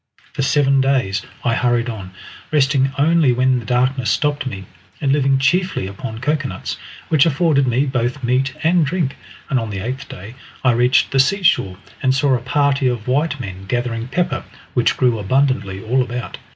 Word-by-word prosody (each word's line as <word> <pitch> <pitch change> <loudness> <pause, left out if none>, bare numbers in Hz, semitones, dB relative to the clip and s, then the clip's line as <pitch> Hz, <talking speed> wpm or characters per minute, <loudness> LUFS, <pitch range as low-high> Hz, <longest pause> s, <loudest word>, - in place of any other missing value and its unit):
For - - -3
seven 135 0 +3
days 125 -8 +1 0.2
I 120 - +2
hurried 120 0 +1
on, 105 -6 -6 0.4
resting 135 -2 +2
only 155 -1 +3
when 130 +1 +2
the 115 - -9
darkness 125 +1 +1
stopped 145 -2 0
me, 95 -6 -6 0.3
and 135 - 0
living 135 -1 +3
chiefly 180 - +1
upon 100 +3 -6
cocoanuts, 145 0 -2 0.3
which 155 0 +4
afforded 145 -3 +2
me 125 +4 +2
both 130 0 -2
meat 130 +2 0
and 170 +1 +3
drink, 150 -2 -1 0.3
and 130 - +1
on 115 -1 -4
the 100 - -5
eighth 125 +7 -5
day 100 +6 -9 0.3
I 130 - +4
reached 125 +2 +3
the 135 - +1
seashore 135 - +2 0.2
and 130 -1 +2
saw 140 0 +2
a 125 - 0
party 140 +1 +1
of 120 -3 -2
white 145 +2 0
men 95 -5 -7
gathering 120 0 -2
pepper, 170 +7 -1 0.3
which - - +2
grew 120 -3 +2
abundantly 105 -4 0
all 125 +4 +1
about. 125 -1 -5
130 Hz, 175 wpm, -19 LUFS, 120-140 Hz, 0.4 s, which